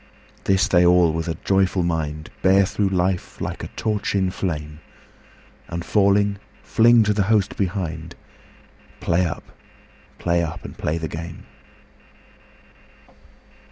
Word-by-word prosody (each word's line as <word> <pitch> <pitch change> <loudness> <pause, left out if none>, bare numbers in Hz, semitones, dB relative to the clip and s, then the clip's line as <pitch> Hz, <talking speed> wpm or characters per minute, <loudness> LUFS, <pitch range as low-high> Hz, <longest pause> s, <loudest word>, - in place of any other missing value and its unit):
This 95 -1 +3
they 90 -1 +4
all 90 -2 +5
with 80 0 -3
a 80 -2 -3
joyful 95 -1 +2
mind 75 -3 -3
Bear 95 +1 +5
through 100 +1 0
life 90 -1 -1
like - - -4
a - - -4
torch 105 -2 -2
in 95 -2 +1
flame, 75 -5 -4 0.9
And 85 0 -5
falling 100 0 +2 0.2
fling 115 0 +5
to 105 0 +2
the 105 - +1
host 105 -4 +2
behind 85 -5 -3 0.8
"Play 85 +1 +1
up! 85 - -7 0.7
play 85 0 +1
up! 80 -1 -5
and - - -8
play 80 +2 -2
the 80 -1 -3
game!" 80 +2 -8
90 Hz, 130 wpm, -22 LUFS, 80-100 Hz, 0.9 s, all